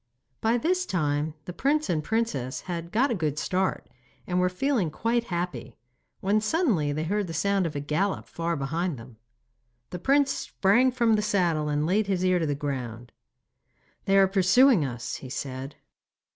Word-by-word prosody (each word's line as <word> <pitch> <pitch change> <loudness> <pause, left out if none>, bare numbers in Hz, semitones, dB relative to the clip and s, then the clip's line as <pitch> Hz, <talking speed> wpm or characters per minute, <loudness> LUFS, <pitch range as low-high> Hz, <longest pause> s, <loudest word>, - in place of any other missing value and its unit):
By 225 +2 +2
this 360 +8 0
time 150 -2 -1
the 180 - -6
prince 290 - +1
and 155 -3 0
princess 180 - -2
had 170 -2 -5
got 250 +5 +2
a - - +2
good 155 -7 -2
start, 185 +4 -1 0.4
and 180 0 0
were 180 0 +3
feeling 215 - 0
quite 230 +8 -1
happy, 170 - -4 0.4
when 205 +3 +2
suddenly 215 - +1
they 155 +2 -2
heard 200 +4 -1
the 165 - -6
sound 195 +2 +1
of 150 - -7
a - - -1
gallop 155 +8 -1
far 170 0 -2
behind 160 +3 -2
them. 115 0 -13 0.7
The 180 - -5
prince 275 +6 +3
sprang 235 +7 +2
from 235 -3 +2
the - - +1
saddle, 170 -7 +1
and 150 0 0
laid 200 +5 +1
his 185 -2 0
ear 185 -1 +3
to 160 - -1
the 145 - 0
ground. 125 -5 -5 0.9
'They 195 0 +3
are 195 -1 +6
pursuing 195 - +4
us,' 120 -4 -4
he 130 - -10
said. 135 +1 -5
180 Hz, 175 wpm, -26 LUFS, 150-215 Hz, 0.9 s, are